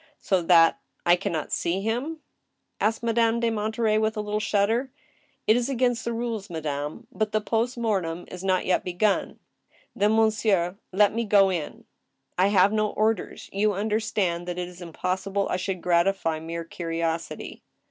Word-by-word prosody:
•' - - -29 0.2
So 190 -2 +1
that 165 -1 +5 0.3
I 175 0 +6
can 195 +2 -3
not 160 -3 -3
see 180 +3 0
him? 250 +9 -2 0.3
" - - -26
asked 220 +2 +1
Madame 230 0 +2
de 235 -1 +1
Monterey, 220 0 0
with 220 0 0
a - - 0
little 210 0 -2
shudder. 220 +5 +1 0.3
" - - -40
It 215 - +5
is 245 +2 0
against 245 -3 +1
the 235 - -1
rules, 230 -3 -3
madame, 150 +4 -4
but 215 -1 -1
iht 215 -1 0
past 235 +3 0
tnortem 185 -7 -1
is 180 0 -7
not 185 -1 +1
yet 185 - +1
begun." 190 +3 0 0.3
" - - -34
Then, 210 +2 +3
monsieur, 210 -4 +2
let 205 +2 +4
me 230 +1 0
go 200 -3 +4
in." 170 -5 -5 0.5
"I 185 +2 +3
have 200 0 +4
no 215 -1 +1
orders. 215 -1 -1
You 205 +1 +2
understand 205 -4 -1
that 175 0 -4
it 180 0 -3
is 180 0 -12
impossible 190 +4 -2
I - - +1
should 185 -1 -4
gratify 170 -2 +2
mere 165 +1 -5
curiosity." 165 0 -4
200 Hz, 180 wpm, -26 LUFS, 175-220 Hz, 0.5 s, I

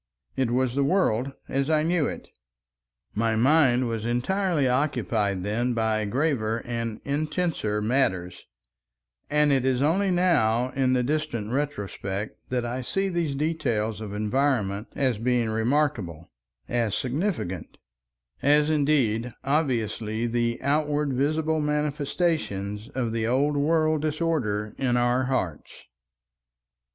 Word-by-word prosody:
It 130 -3 +1
was 125 0 +1
the 140 +1 +1
world 135 - +1 0.2
as 135 +2 -1
I 155 -1 +3
knew 165 -2 +1
it. - - -6 0.9
My 115 +1 +1
mind 130 0 +4
was 115 -2 -3
entirely 145 - +1
occupied 115 -8 0
then 120 +5 0
by 110 -1 +1
graver 115 -2 0
and 115 -2 -3
intenser 150 - -1
matters, 95 -7 0 0.8
and 150 0 +3
it 135 -2 +2
is 130 -1 +1
only 175 +8 +2
now 130 -10 +2
in 130 -1 +1
the 125 -1 +2
distant 125 -6 -2
retrospect 105 -7 -4
that 125 -1 -1
I 125 +2 -3
see 195 +10 -1
these 170 -6 -1
details 120 -9 -1
of 105 -2 -6
environment 105 -1 0
as 130 -6 0
being 120 -1 +1
remarkable, 110 - -1 0.4
as 115 -4 0
significant, 130 - -3 0.6
as 150 +2 +4
indeed 125 -6 +1
obviously 115 -6 0
the 120 0 0
outward 145 0 +1
visible 155 +4 +1
manifestations 150 - -1
of 120 -3 -1
the 115 -1 0
old 140 +5 +2
world 155 +1 +2
disorder 145 -10 -1
in 125 -2 +1
our 120 +1 +2
hearts. 110 - -3
130 Hz, 120 wpm, -26 LUFS, 110-150 Hz, 0.9 s, mind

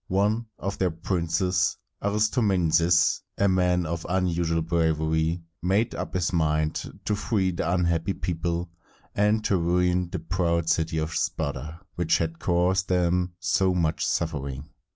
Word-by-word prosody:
One 105 +5 +1
of 100 +1 -4
their 95 - +2
princes, 90 +1 0 0.2
Ar 100 - 0
is 105 0 +2
tom´e 105 -7 +2
nes, 85 +1 +3 0.2
a 100 - +3
man 90 -2 +2
of 80 +1 -3
unusual 85 -3 0
bravery, 80 0 0 0.2
made 100 +6 +1
up - - -5
his 90 0 0
mind 80 -1 0
to 105 - +1
free 100 -2 0
the 85 -1 -2
unhappy 85 0 +1
people, 85 0 -3 0.4
and 105 +1 +2
to 100 - +2
ruin 90 +1 +1
the 90 - -3
proud 85 0 0
city 80 -1 +1
of 80 +1 -2
Sparta, 75 +4 -3 0.2
which 80 -2 +2
had 80 0 -3
caused 90 +2 +1
them 90 0 +1
so 95 0 +1
much 80 -3 0
suffering. 70 -3 -2
85 Hz, 150 wpm, -26 LUFS, 80-95 Hz, 0.4 s, nes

